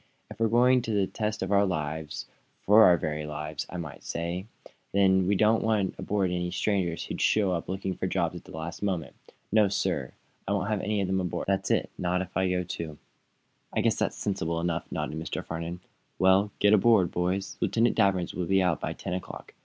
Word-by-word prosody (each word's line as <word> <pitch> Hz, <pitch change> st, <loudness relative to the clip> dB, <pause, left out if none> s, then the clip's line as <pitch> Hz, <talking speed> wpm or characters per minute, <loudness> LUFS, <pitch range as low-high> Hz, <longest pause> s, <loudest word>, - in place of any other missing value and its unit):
"If -, -, -10 dB
we're 115 Hz, -, +3 dB
going 125 Hz, +3 st, +5 dB
into 115 Hz, -3 st, -1 dB
the 100 Hz, -1 st, +3 dB
test 105 Hz, +1 st, -3 dB
of 95 Hz, -, -3 dB
our 100 Hz, 0 st, +5 dB
lives 80 Hz, -3 st, -3 dB, 0.4 s
for 110 Hz, +2 st, +7 dB
our 90 Hz, -1 st, +6 dB
very 75 Hz, -1 st, -3 dB
lives, 75 Hz, 0 st, -5 dB
I 90 Hz, -, -6 dB
might 80 Hz, -5 st, -7 dB
say 85 Hz, +4 st, -3 dB, 0.5 s
then 95 Hz, -2 st, +4 dB
we 100 Hz, -, +3 dB
don't 110 Hz, +3 st, +3 dB
want 105 Hz, -4 st, +1 dB
aboard 100 Hz, -3 st, 0 dB
any 90 Hz, 0 st, -1 dB
strangers 90 Hz, -2 st, -1 dB
who -, -, -5 dB
show 100 Hz, -3 st, +3 dB
up 85 Hz, -1 st, -3 dB
looking 95 Hz, 0 st, -2 dB
for -, -, -3 dB
jobs -, -, 0 dB
at -, -, -9 dB
the -, -, -13 dB
last 80 Hz, +1 st, -6 dB
moment. 90 Hz, -8 st, -2 dB, 0.4 s
No, 105 Hz, -1 st, +5 dB
sir; 100 Hz, -, -1 dB, 0.3 s
I -, -, +1 dB
won't 100 Hz, 0 st, -1 dB
have 105 Hz, -, +1 dB
them 95 Hz, -2 st, 0 dB
aboard 90 Hz, -1 st, -3 dB
that 95 Hz, 0 st, 0 dB
is, -, -, +2 dB
not 90 Hz, +1 st, 0 dB
if 95 Hz, -, -13 dB
I 95 Hz, -1 st, +2 dB
go, 90 Hz, 0 st, 0 dB
too!" 80 Hz, -3 st, -6 dB, 0.8 s
"I -, -, +1 dB
guess -, -, +2 dB
that's -, -, -1 dB
sensible 85 Hz, -5 st, -2 dB
enough," 85 Hz, -1 st, -2 dB
nodded 75 Hz, -, -3 dB
Mr. 80 Hz, -, -4 dB
Farnum. 85 Hz, +2 st, -5 dB, 0.4 s
"Well, 95 Hz, +2 st, +4 dB
get 105 Hz, 0 st, +4 dB
aboard, 105 Hz, -3 st, +4 dB
boys. 90 Hz, +2 st, -2 dB
Lieutenant 115 Hz, +1 st, +2 dB
Danvers 95 Hz, -5 st, +2 dB
will 90 Hz, -2 st, -3 dB
be 95 Hz, -1 st, +3 dB
out 85 Hz, -5 st, +1 dB
by -, -, -2 dB
ten -, -, -5 dB
o'clock. 90 Hz, -2 st, -7 dB
95 Hz, 205 wpm, -28 LUFS, 85-100 Hz, 0.8 s, for